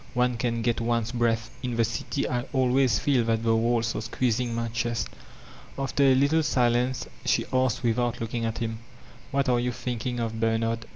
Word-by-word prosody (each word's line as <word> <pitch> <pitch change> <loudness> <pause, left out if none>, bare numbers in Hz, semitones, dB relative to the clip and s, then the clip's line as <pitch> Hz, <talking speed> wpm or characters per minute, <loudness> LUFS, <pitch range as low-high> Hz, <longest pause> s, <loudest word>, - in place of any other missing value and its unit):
One 125 0 +2
can 115 -1 -1
get 120 0 +1
one's 115 -1 0
breath. 115 -1 0
In 125 -2 -3
the 115 0 +3
city 120 +5 -2
I 125 -1 -1
always 130 -3 +3
fed 130 -5 +1
that 115 0 +1
the 115 0 +3
walls 115 0 +1
are - - -2
squeezing 120 +1 -1
my 115 0 -2
chest/' 115 -1 -1 0.7
After 135 +1 -1
a 135 -1 +6
little 140 +5 +3
silence 125 -2 +1 0.2
she - - +1
asked 130 -2 +1
without 120 0 0
looking 115 +1 -3
at 115 0 -2
him: 115 -1 -3 0.5
''IMiat 140 -1 +1
are 120 -1 +3
you 125 +1 0
thinkhn 120 0 -3
of, 115 -1 -3
Bernard?" 115 0 0
120 Hz, 185 wpm, -26 LUFS, 115-125 Hz, 0.7 s, a